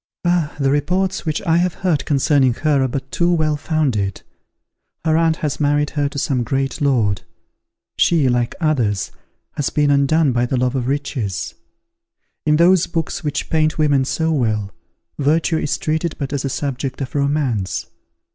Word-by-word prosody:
Ah! 175 -4 +1
the 135 -1 +2
reports 185 +6 0
which 155 +4 -1
I 165 -3 +2
have 175 0 +1
heard 155 -6 +1
concerning 135 -3 +2
her 145 -1 +1
are - - +1
but 135 +1 -5
too 175 0 +1
well 155 -3 +1
founded. 135 - -1 0.8
Her 160 -1 +3
aunt 165 0 +3
has 150 -4 -3
married 145 0 +1
her 145 -2 0
to 140 - -8
some 135 -2 0
great 135 +5 -2
lord. 115 -9 +2 0.8
She, 160 -6 +3
like 120 -1 0
others, 120 - 0 0.4
has 145 - -2
been 145 -1 +2
undone 140 +1 +3
by 120 0 +1
the 130 - -1
love 125 +1 0
of 125 -2 -1
riches. 130 - -2 0.9
In 150 - +5
those 175 +2 +4
books 165 -2 -3
which 150 -2 -3
paint 155 -1 +2
women 145 -3 +3
so 160 +4 -1
well, 110 -8 0 0.5
virtue 160 +3 +2
is 145 - -1
treated 160 +1 -1
but 140 0 -4
as 140 - -1
a 135 - -1
subject 135 -1 -3
of 130 - -5
romance. 140 - 0
145 Hz, 165 wpm, -19 LUFS, 130-155 Hz, 0.9 s, In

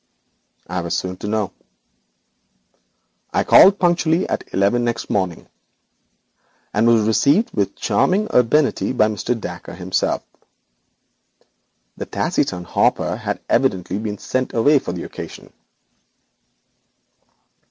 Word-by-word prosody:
I 90 +1 -3
was 85 0 -2
soon 90 0 -4
to 105 - -6
know. 105 -3 -1 1.8
I - - +1
called 195 +1 +7
punctually 175 -1 +1
at - - -4
eleven 100 +5 +1
next 120 -1 -3
morning, 95 -4 -2 1.3
and 110 +3 +2
was 115 -2 +4
received 140 - +2
with 100 -2 -1
charming 205 +4 +1
urbanity 130 +3 +2
by 110 -4 +3
Mr. 115 +3 -2
Dacre 90 -3 -8
himself. 95 0 -1 1.7
The - - -6
taciturn 90 0 -1
Hopper - - +1
had - - -4
evidently 95 +1 0
been 105 -1 -4
sent 130 +6 -3
away 145 +5 +4
for 90 - -5
the 90 -1 -5
occasion. - - -9
110 Hz, 110 wpm, -20 LUFS, 95-135 Hz, 1.8 s, called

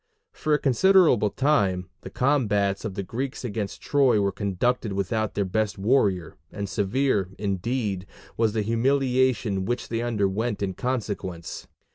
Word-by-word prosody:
For 155 - -3
a 150 - +5
considerable 150 - +4
time, 100 -10 +1
the - - -8
combats 105 -8 +1
of 105 -4 -4
the 100 - -3
Greeks 130 +6 -4
against 105 -3 -4
Troy 135 -6 +3
were 100 -1 +1
conducted 105 +3 -1
without 105 +3 -1
their 100 - +1
best 105 +2 -1
warrior, 100 -6 +1
and 100 -1 -4
severe, 105 0 0
indeed, 100 0 -2 0.3
was 110 -2 +1
the 110 -2 0
humiliation 125 -3 +1
which 120 +4 -3
they 115 0 -1
underwent 110 -1 -1
in 95 -1 -1
consequence. 100 -8 -4
110 Hz, 140 wpm, -25 LUFS, 100-125 Hz, 0.3 s, a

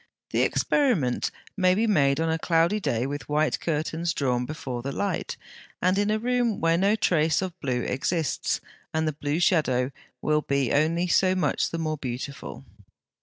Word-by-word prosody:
The - - +2
experiment 205 - +1 0.3
may 185 -2 +3
be 220 +3 +2
made 140 -9 +3
on 165 - +1
a 160 - -1
cloudy 170 +5 +2
day 120 - -1
with 145 +2 -5
white 150 +1 +1
curtains 165 +1 -1
drawn 125 -3 0
before 130 -5 -5
the 140 +3 -4
light, 200 +7 -2 0.4
and 185 +1 +2
in 205 +1 +1
a 215 - +2
room 240 -1 0
where 165 0 +3
no 195 +5 +3
trace 160 -7 +2
of 185 -1 -4
blue 125 -3 -1
exists, 155 +3 -1 0.3
and 160 0 +1
the 155 - 0
blue 145 +2 -2
shadow 140 -9 +2 0.3
will 150 0 +1
be 140 -4 0
only 160 +4 +2
so 185 +1 +3
much 185 - +1
the 165 - -4
more 155 -1 -2
beautiful. 135 +2 -6
160 Hz, 170 wpm, -26 LUFS, 140-185 Hz, 0.4 s, may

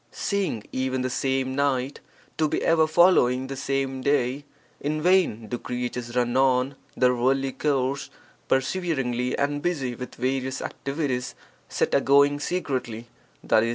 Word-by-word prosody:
Seeing 195 - -2
even 130 0 -1
the 130 - -2
same 130 0 0
night 135 -1 0 0.4
to 155 - +3
be - - -1
ever 160 -1 +4
following 155 -7 +4
the 135 +1 -5
same 135 -1 -2
day, 140 0 0 0.3
in 150 +2 -2
vain 170 - +2
do 120 +2 -4
creatures 125 -1 -4
run 120 0 +1
on 130 0 +2 0.2
(their 125 -1 +4
worldly 135 +2 +1
course) 140 -1 -1 0.4
perseveringly 135 -4 0
and 145 +1 0
busy 145 -7 -1
with 125 +1 -8
various 130 +1 -2
activities 135 -3 -3 0.3
set - - 0
agoing 140 +1 +4
secretly, 130 -10 -3 0.4
i.e. 110 +1 +4
135 Hz, 135 wpm, -25 LUFS, 125-145 Hz, 0.4 s, ever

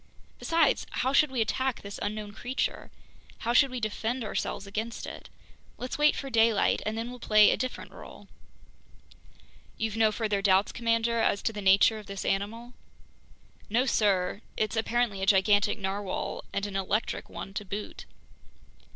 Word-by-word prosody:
Besides, 330 -4 +2
how 260 +2 -1
should 300 +1 +5
we 260 -3 -1
attack 260 +5 -1
this 200 0 -7
unknown 210 0 -4
creature, 245 +5 -3 0.5
how 235 - -1
should 275 +2 +5
we 255 -1 -4
defend 230 +3 -2
ourselves 205 -1 -3
against 220 +4 -4
it? - - -9 0.5
Let's 250 +3 -5
wait 300 0 +5
for 275 -1 -5
daylight, 225 -2 +3
and 215 +1 -2
then 230 +2 -4
we'll 250 - -9
play 215 -2 +5
a - - +2
different 255 +4 -5
role." - - -12 1.5
"You've 225 -1 -2
no 220 -1 +4
further 210 -2 -1
doubts, 195 0 +3
commander, 230 0 0
as 205 -2 +1
to 225 - 0
the 210 - -5
nature 195 +3 +5
of 210 - -13
this 200 -1 -6
animal?" 225 +5 -2 1.0
"No, 240 +5 +2
sir, 200 -5 +1 0.2
it's 215 0 -1
apparently 225 -3 0
a 195 - -1
gigantic 205 +2 +4
narwhale, 195 -1 -3
and 200 - -2
an 200 -1 -6
electric 195 +3 -2
one 195 - -8
to 210 - -4
boot." 205 +2 -6
215 Hz, 160 wpm, -28 LUFS, 200-235 Hz, 1.5 s, should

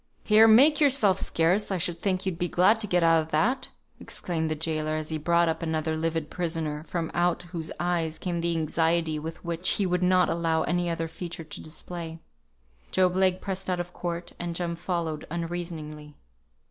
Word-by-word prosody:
"Here! 220 +1 +6
make 275 +7 +6
yourself 240 -10 +5
scarce! 175 +6 +1
I 190 - 0
should 170 0 -1
think 185 0 -1
you'd 185 -3 -2
be 175 - +1
glad 205 +6 +3
to 210 - +1
get 180 -2 +2
out 165 -1 +5
of 155 - -7
that!" 245 - +1 0.3
exclaimed 160 -3 -3
the 155 - -1
gaoler, 155 0 -1
as 155 0 -4
he 155 -1 -2
brought 170 +2 +2
up 160 +1 -1
another 160 -1 -1
livid 160 -1 -2
prisoner, 160 -4 -2
from 165 -2 -3
out 175 0 +1
whose 165 -3 -4
eyes 170 -3 -1
came 170 0 -3
the 170 0 0
anxiety 160 0 +1
which 165 +2 -2
he 200 - +2
would 180 0 0
not 180 -1 +4
allow 165 -1 0
any 175 0 0
other 165 -1 -2
feature 170 +1 -7
to 155 - -9
display. 165 +1 -7 0.7
Job 185 -1 +2
Legh 185 -1 +2
pressed 190 -1 -4
out 180 -1 0
of 175 0 -5
court, 170 0 -5
and 170 -1 -4
Jem 170 -1 -2
followed 170 -3 -3
unreasoningly. 165 -3 -5
170 Hz, 185 wpm, -27 LUFS, 160-180 Hz, 0.7 s, Here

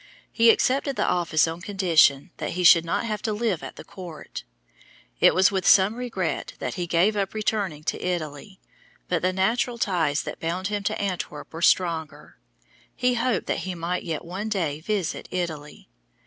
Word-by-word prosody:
He 230 0 +5
accepted 270 +4 +2
the - - 0
office 170 -3 +2
on 165 +1 -5
condition 170 -8 +3
that - - -4
he 180 - -2
should 165 -1 +8
not 165 - -1
have 215 -2 -3
to 220 - -2
live 210 -5 -1
at - - -8
the - - -10
court. 175 -5 -9 0.8
It - - +5
was 190 +2 +5
with 190 -2 -1
some 195 +2 +6
regret 230 -8 -3
that - - -4
he 175 -1 -4
gave 175 +6 +2
up 200 0 -2
returning 205 -8 -2
to - - -3
Italy, 175 +1 -4 0.5
but 175 -2 0
the 185 - +1
natural 225 +6 0
ties 170 - 0
that - - -7
bound 180 +4 -2
him 205 -1 -2
to - - -1
Antwerp 180 -7 -4
were 165 - -6
stronger. 160 -4 0 0.6
He 250 0 +1
hoped 240 0 0
that - - -1
he 185 -1 -5
might 170 +2 -2
yet 165 -1 -4
one 190 +5 -5
day 165 -8 -1
visit 195 -1 -2
Italy. 160 -5 -5
185 Hz, 180 wpm, -25 LUFS, 165-210 Hz, 0.8 s, should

